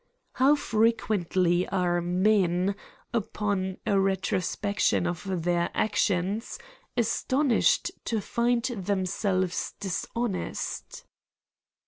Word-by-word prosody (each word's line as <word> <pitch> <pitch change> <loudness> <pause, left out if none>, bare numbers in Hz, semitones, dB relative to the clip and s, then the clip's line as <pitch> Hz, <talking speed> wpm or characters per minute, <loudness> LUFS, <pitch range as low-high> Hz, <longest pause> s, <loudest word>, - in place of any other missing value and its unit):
How 275 +3 +5
frequently 195 - +1
are 175 -2 +1
men, 185 +1 +2 0.4
upon 200 -4 -1
a 200 - +3
retrospection 195 0 0
of 175 0 -3
their 175 0 +1
actions, 205 0 0 0.4
astonished 255 +3 +2 0.2
to 225 - 0
find 235 +3 0
themselves 190 -4 -1
dishonest 205 +2 -3
195 Hz, 75 wpm, -27 LUFS, 180-220 Hz, 0.4 s, How